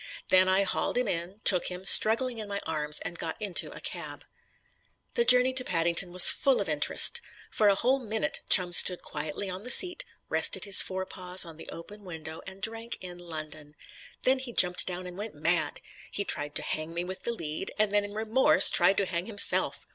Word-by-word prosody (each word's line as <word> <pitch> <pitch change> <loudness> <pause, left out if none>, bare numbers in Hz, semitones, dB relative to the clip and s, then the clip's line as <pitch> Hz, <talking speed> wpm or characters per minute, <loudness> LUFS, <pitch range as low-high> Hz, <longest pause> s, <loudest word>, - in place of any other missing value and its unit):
Then 185 0 +4
I 190 +1 +1
hauled 195 - -3
him 250 -2 -1
in, 180 +3 -6
took 180 -3 +4
him, 180 +1 -8
struggling, 230 +4 +4
in 210 -1 -8
my 200 0 -4
arms 150 -1 -3
and 170 - -8
got 160 - -7
into 200 -4 -2
a - - -11
cab. - - -9 0.9
The 475 - 0
journey 250 - +3
to 255 0 +2
Paddington 170 -1 +2
was 180 0 +8
full 270 -2 0
of 200 - -4
interest. 155 - +2 0.3
For 215 - 0
a 200 - +3
whole 255 +6 -1
minute 220 - -4
Chum 180 -2 +3
stood 180 0 +3
quietly 150 +6 -6
on 185 0 -8
the 245 - -7
seat, 355 +8 +4 0.2
rested - - 0
his 200 -2 +7
fore 190 0 -5
paws 185 0 -2
on 165 -2 -12
the - - -12
open 205 +5 -12
window 160 -3 -10
and 195 +1 -12
drank 225 +1 -4
in 180 -1 -11
London. 155 -3 -10 0.5
Then 260 +1 +1
he 255 -2 -7
jumped 180 -3 +1
down 180 0 -6
and 180 +1 -11
went 220 +2 -8
mad. - - -2 0.3
He 200 - -3
tried 145 0 -4
to - - -2
hang 155 +2 -6
me 170 - -3
with 185 +1 -9
the 235 - -2
lead, 165 -5 -6
and 215 -1 +1
then 205 0 +1
in 205 0 -9
remorse 220 +4 +4
tried 185 +2 +3
to 200 - 0
hang 175 0 -4
himself. 205 -3 +2
190 Hz, 210 wpm, -26 LUFS, 170-215 Hz, 0.9 s, was